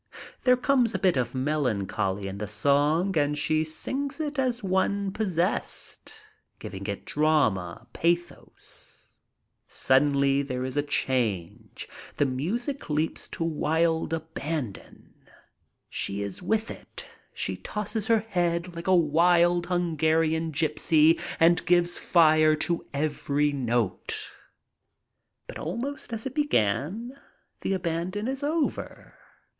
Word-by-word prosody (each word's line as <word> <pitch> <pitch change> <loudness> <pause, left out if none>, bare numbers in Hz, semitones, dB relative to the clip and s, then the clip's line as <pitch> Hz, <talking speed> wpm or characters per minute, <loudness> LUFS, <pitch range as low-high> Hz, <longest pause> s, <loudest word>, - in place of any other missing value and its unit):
There 250 -1 +6
comes 250 -4 +2
a - - +2
bit 185 -3 +2
of 125 -1 -1
melancholy 110 -8 -1
in 95 +1 -6
the 105 - -3
song 145 - +2
and 150 -1 +1
she 155 +1 +1
sings 270 - -3
it 295 -2 -3
as 250 -3 0
one 195 +1 0
possessed, 200 - -2 0.3
giving - - -7
it - - -4
drama, 140 - +1
pathos. 170 +1 -4 0.5
Suddenly 140 0 +3
there 130 -2 -3
is 130 - -4
a 145 - +3
change. 120 - -2 0.3
The 145 - +2
music 200 - -3
leaps 155 +2 -1
to - - -4
wild 160 0 +1
aban 160 -6 -3
don. - - -16 0.7
She 100 +1 -2
is 100 - -6
with 220 +4 0
it. - - -9 0.3
She - - -2
tosses 210 0 -3
her 225 -2 +4
head 175 -4 -1
like 170 +2 -7
a 185 - +5
wild 175 +2 +3
Hun 175 -2 0
garian 160 +1 +2
gypsy 155 +1 +3 0.2
and 165 +1 +4
gives 175 0 +3
fire 155 -2 +5
to 170 +2 -1
every 145 0 0
note. 120 -7 -1 1.1
But - - -8
almost 245 - -4
as 225 -1 -5
it 265 - -4
began, 215 - 0 0.5
the - - -1
abandon 185 +4 -2
is 270 +1 -3
over. 305 +1 -2
160 Hz, 125 wpm, -27 LUFS, 145-190 Hz, 1.1 s, There